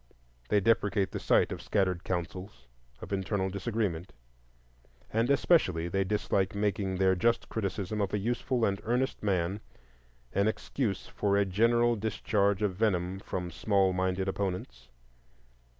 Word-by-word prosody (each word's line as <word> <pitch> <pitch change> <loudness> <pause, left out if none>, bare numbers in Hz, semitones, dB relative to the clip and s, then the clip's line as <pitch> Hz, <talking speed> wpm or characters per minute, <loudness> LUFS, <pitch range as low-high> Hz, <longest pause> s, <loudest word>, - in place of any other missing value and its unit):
They 105 - +4
deprecate 105 -2 +2
the - - -4
sight - - +3
of - - -5
scattered 95 -3 0
counsels, 90 +2 -5 0.4
of 95 - -6
internal 95 0 -1
disagreement; 100 -3 -2 1.0
and 115 +3 +2
especially 95 - +3
they 95 +2 +1
dislike 100 0 0
making 100 -2 0
their 95 0 +3
just 115 +6 +1
criticism 105 0 -2
of 100 - -1
a - - 0
useful 120 +3 0
and 100 0 -1
earnest 125 +3 0
man 95 -1 0 0.7
an 100 +1 +2
excuse 110 -2 -2
for 100 -1 0
a 100 - +3
general 115 +5 +3
discharge 105 -1 0
of 100 -3 +1
venom 95 -3 0
from 90 -2 -4
small 95 +1 +2
minded 95 +1 0
opponents. 90 -11 -4
100 Hz, 135 wpm, -30 LUFS, 95-110 Hz, 1.0 s, They